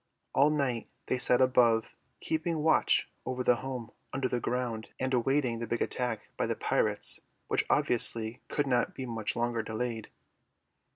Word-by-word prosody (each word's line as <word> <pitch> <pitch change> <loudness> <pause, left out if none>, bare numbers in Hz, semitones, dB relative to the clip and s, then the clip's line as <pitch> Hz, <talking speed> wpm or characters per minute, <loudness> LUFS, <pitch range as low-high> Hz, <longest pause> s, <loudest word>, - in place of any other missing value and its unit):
All 140 +2 +5
night 140 -6 -1 0.2
they 130 - -1
sat 125 0 +4
above, 120 -3 +3 0.3
keeping 160 -1 -1
watch 160 - +3 0.2
over 130 0 -3
the 125 -1 +4
home 125 -3 -6 0.2
under 135 -1 -1
the 125 - -1
ground 120 -3 -2
and 130 0 -1
awaiting 125 -1 +1
the 115 - -4
big 120 - 0
attack 120 -4 -3
by - - 0
the - - -1
pirates - - +2 0.3
which - - +1
obviously 115 -1 +2
could 145 - 0
not 125 -3 +1
be 130 - -5
much 115 -3 -3
longer 120 -1 0
delayed. 110 0 -4
125 Hz, 160 wpm, -30 LUFS, 115-130 Hz, 0.3 s, All